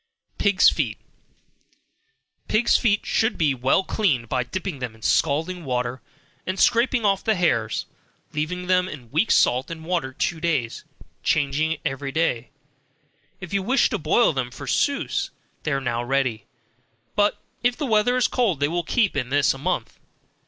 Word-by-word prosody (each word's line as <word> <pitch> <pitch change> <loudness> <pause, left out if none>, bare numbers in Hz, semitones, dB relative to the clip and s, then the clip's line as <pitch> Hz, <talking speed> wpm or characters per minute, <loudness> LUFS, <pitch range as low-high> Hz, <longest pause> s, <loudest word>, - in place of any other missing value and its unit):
Pigs' 200 -2 +4
Feet. - - +1 1.5
Pigs' 225 +2 +3
feet 210 -4 +2
should 220 0 +1
be 150 -4 +2
well 130 +8 +2
cleaned 150 - 0
by 125 +1 0
dipping 180 +3 -5
them 125 -3 -5
in 110 - -18
scalding 165 +9 +1
water, 125 -1 -2 0.4
and 185 +1 -4
scraping 235 -1 +3
off 195 -1 +2
the 220 - +2
hairs, 115 - 0 0.5
leave 150 +1 -1 0.2
them 180 0 +2
in 125 -8 -10
weak 165 +9 +1
salt 125 +2 +3
and 160 -1 -7
water 165 -6 -1
two 160 +5 -2
days, 150 -9 -1 0.4
changing 155 +2 +1
it - - -10
each 135 0 -3
day; 125 -8 0 0.9
if 185 -2 -9
you 200 - +1
wish 245 +7 +2
to 220 - -1
boil 230 +4 +3
them 130 -3 -2
for 140 +3 -9
souse, 280 - 0 0.3
they 150 - -2
are 140 - +1
now 120 -2 -2
ready, 125 -4 -1 0.7
but 205 0 +2 0.2
if 245 0 +1
the 300 - -2
weather 240 +1 +2
is 255 - +3
cold 220 - 0
they 145 - +2
will 175 +3 -1
keep 210 +4 +1
in 125 - -2
this 145 +1 +3
a 135 - -10
month. - - -3
160 Hz, 165 wpm, -23 LUFS, 130-200 Hz, 1.5 s, Pigs